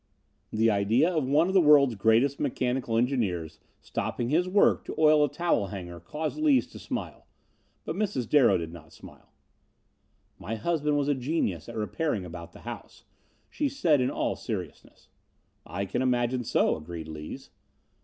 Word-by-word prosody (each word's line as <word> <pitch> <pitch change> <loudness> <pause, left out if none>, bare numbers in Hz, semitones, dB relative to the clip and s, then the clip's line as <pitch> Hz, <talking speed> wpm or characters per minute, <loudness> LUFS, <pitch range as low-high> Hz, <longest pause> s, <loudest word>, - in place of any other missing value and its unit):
The 110 +1 +3
idea 110 - +2
of 150 -5 0
one 150 +5 +3
of 190 - -2
the 190 - +6
world's 145 -5 +6
greatest 115 +7 +2
mechanical 125 -3 -1
engineers 100 - -1 0.2
stopping 120 0 -3
his 175 +5 +1
work 200 +2 +3
to - - -6
oil 155 -1 +5
a 145 - +2
towel 155 - 0
hanger 90 -3 -7
caused 150 - -5
Lees 295 -4 +4
to - - -10
smile, - - -6 0.6
but - - -3
Mrs. 195 - -2
Darrow 125 -9 +5
did 85 -1 -6
not 80 -2 -13
smile. - - -15 1.1
"My 115 - -4
husband 150 +4 0
was 145 -1 0
a 145 - +3
genius 125 - -2
at 115 - -8
repairing 110 - -2
about 85 -1 -9
the - - -15
house," - - -9 0.4
she 295 -2 -2
said, 165 - +2
in 125 - +1
all - - -1
seriousness. - - -7 0.6
"I 100 +4 -3
can 100 - -2
imagine 125 -1 +1
so," - - +2
agreed 80 0 -8
Lees. 75 -1 -8
125 Hz, 165 wpm, -27 LUFS, 100-150 Hz, 1.1 s, the